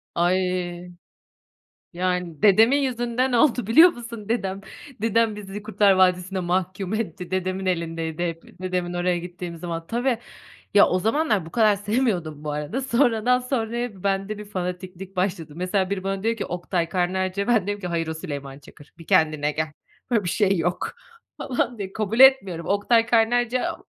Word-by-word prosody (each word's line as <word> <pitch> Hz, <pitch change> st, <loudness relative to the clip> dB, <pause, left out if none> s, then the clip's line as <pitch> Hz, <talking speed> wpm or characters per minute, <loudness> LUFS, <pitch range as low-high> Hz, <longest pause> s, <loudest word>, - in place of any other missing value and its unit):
Ay. 180 Hz, 0 st, 0 dB, 1.0 s
Yani 180 Hz, -1 st, -2 dB
dedemin 220 Hz, +6 st, +6 dB
yüzünden 250 Hz, -1 st, 0 dB
oldu 245 Hz, -3 st, +3 dB
biliyor 320 Hz, +10 st, +8 dB
musun? 230 Hz, -4 st, -9 dB
Dedem, 195 Hz, -4 st, -1 dB, 0.4 s
dedem 225 Hz, -1 st, +2 dB
bizi 200 Hz, 0 st, -7 dB
Kurtlar 210 Hz, -2 st, +3 dB
Vadisi'ne 185 Hz, 0 st, +2 dB
mahkum 185 Hz, +2 st, -2 dB
etti, 195 Hz, -5 st, -4 dB
dedemin 185 Hz, 0 st, -2 dB
elindeydi 165 Hz, -1 st, -2 dB
hep, 165 Hz, 0 st, -6 dB, 0.2 s
dedemin 180 Hz, -1 st, -2 dB
oraya 175 Hz, 0 st, 0 dB
gittiğim 175 Hz, 0 st, -7 dB
zaman. 165 Hz, -1 st, -5 dB
Tabii, 240 Hz, 0 st, 0 dB, 0.6 s
ya 205 Hz, -, +7 dB
o 185 Hz, -, +1 dB
zamanlar 220 Hz, -, +1 dB
bu 165 Hz, -, -11 dB
kadar 215 Hz, -3 st, +4 dB
sevmiyordum 200 Hz, -, -1 dB
bu 150 Hz, -, -3 dB
arada, 150 Hz, -, -3 dB
sonradan 250 Hz, -1 st, +2 dB
sonraya 240 Hz, -5 st, -3 dB
bende 195 Hz, +1 st, -1 dB
bir 210 Hz, -, -8 dB
fanatiklik 185 Hz, 0 st, -6 dB
başladı. 180 Hz, -5 st, -2 dB
Mesela, 185 Hz, +2 st, -1 dB
biri 195 Hz, -2 st, -3 dB
bana 195 Hz, +1 st, -3 dB
diyor 230 Hz, +1 st, +1 dB
ki, -, -, -3 dB
"Oktay 175 Hz, -1 st, -2 dB
Kaynarca." 185 Hz, +2 st, -1 dB
ben 235 Hz, -4 st, +4 dB
de -, -, -11 dB
diyorum 205 Hz, 0 st, -3 dB
ki, 180 Hz, -, -3 dB
"Hayır 165 Hz, -1 st, -2 dB
o 160 Hz, -, -2 dB
Süleyman 140 Hz, -3 st, -7 dB
Çakır, 145 Hz, +1 st, -17 dB
bir 165 Hz, -, -14 dB
kendine 155 Hz, -2 st, +2 dB
gel, 155 Hz, +1 st, -2 dB, 0.4 s
böyle 220 Hz, -4 st, +2 dB
bir 175 Hz, -, -2 dB
şey 195 Hz, -1 st, +2 dB
yok." 175 Hz, +2 st, -1 dB, 0.5 s
falan 245 Hz, -2 st, -2 dB
diye 195 Hz, -1 st, -6 dB
kabul 220 Hz, +2 st, -2 dB
etmiyorum. 200 Hz, -11 st, +5 dB
Oktay 225 Hz, +3 st, +3 dB
Kaynarca 240 Hz, +1 st, +1 dB
190 Hz, 160 wpm, -24 LUFS, 175-225 Hz, 1.0 s, biliyor